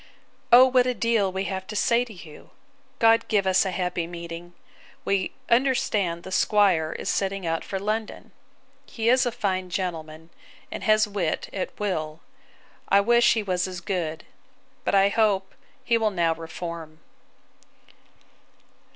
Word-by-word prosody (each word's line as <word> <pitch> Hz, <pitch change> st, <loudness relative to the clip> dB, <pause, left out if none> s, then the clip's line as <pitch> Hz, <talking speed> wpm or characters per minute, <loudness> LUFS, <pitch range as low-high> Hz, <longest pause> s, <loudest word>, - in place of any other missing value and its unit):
'O 245 Hz, +2 st, +9 dB
what 255 Hz, -1 st, +3 dB
a 250 Hz, -, 0 dB
deal 225 Hz, -3 st, +1 dB
we 190 Hz, +1 st, -2 dB
have 190 Hz, -1 st, -4 dB
to 215 Hz, -, -7 dB
say 235 Hz, +3 st, +2 dB
to 245 Hz, -, -11 dB
you! 170 Hz, -6 st, -13 dB, 0.5 s
God 225 Hz, 0 st, +4 dB
give 205 Hz, -3 st, +1 dB
us 190 Hz, +1 st, +3 dB
a -, -, -1 dB
happy 180 Hz, -2 st, -2 dB
meeting! 170 Hz, 0 st, -8 dB, 0.5 s
We 195 Hz, -1 st, 0 dB, 0.2 s
understand 220 Hz, -9 st, +1 dB
the 190 Hz, -, -9 dB
'squire 185 Hz, -6 st, +2 dB
is -, -, -7 dB
setting 195 Hz, -1 st, -1 dB
out 165 Hz, 0 st, -1 dB
for 195 Hz, -, -4 dB
London. 215 Hz, +3 st, -4 dB, 0.6 s
He 230 Hz, 0 st, -1 dB
is 255 Hz, +1 st, +4 dB
a -, -, 0 dB
fine 190 Hz, -6 st, -2 dB
gentleman, 165 Hz, -3 st, -5 dB, 0.4 s
and -, -, -6 dB
has 215 Hz, 0 st, +4 dB
wit 195 Hz, -6 st, -2 dB
at 190 Hz, -, -5 dB
will. 160 Hz, -7 st, -3 dB, 0.7 s
I 200 Hz, -, +5 dB
wish 235 Hz, +3 st, +4 dB
he 220 Hz, -, -1 dB
was 185 Hz, -2 st, -1 dB
as 185 Hz, -1 st, -6 dB
good. 170 Hz, -4 st, -3 dB, 0.6 s
But -, -, +1 dB
I 195 Hz, 0 st, +5 dB
hope 200 Hz, -3 st, +1 dB, 0.3 s
he 230 Hz, -1 st, +2 dB
will 220 Hz, -1 st, +2 dB
now 170 Hz, -4 st, +1 dB
reform. 165 Hz, -1 st, -8 dB
190 Hz, 150 wpm, -25 LUFS, 170-215 Hz, 0.7 s, O